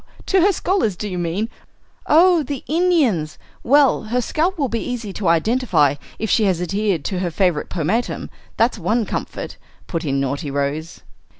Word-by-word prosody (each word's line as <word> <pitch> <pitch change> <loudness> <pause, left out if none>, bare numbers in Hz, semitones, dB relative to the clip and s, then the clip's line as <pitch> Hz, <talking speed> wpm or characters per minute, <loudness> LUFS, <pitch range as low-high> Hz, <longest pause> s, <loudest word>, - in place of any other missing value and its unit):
To 380 -1 +3
her 400 +4 +5
scholars, 365 - 0
do 210 - -5
you 180 -3 -4
mean? 175 +6 -1 0.6
Oh, 340 +2 +5
the 280 -2 -5
Indians! 295 - +1 0.2
Well, 275 -3 +4
her 240 +3 0
scalp 330 +9 0
will 280 -4 0
be 230 -1 -2
easy 235 -5 -4
to 195 -2 -3
identify 170 - +3 0.2
if 220 - -2
she 215 0 +3
has 185 -4 +1
adhered 190 -2 -1
to 185 - -2
her 180 -1 -1
favorite 175 -2 0
pomatum; 185 +9 -2 0.3
that's 230 -1 +2
one 215 +6 +1
comfort," - - -5 0.3
put 165 -2 -3
in 140 -3 0
naughty 140 +3 -2
Rose. 145 +4 -3
210 Hz, 170 wpm, -20 LUFS, 170-260 Hz, 0.6 s, her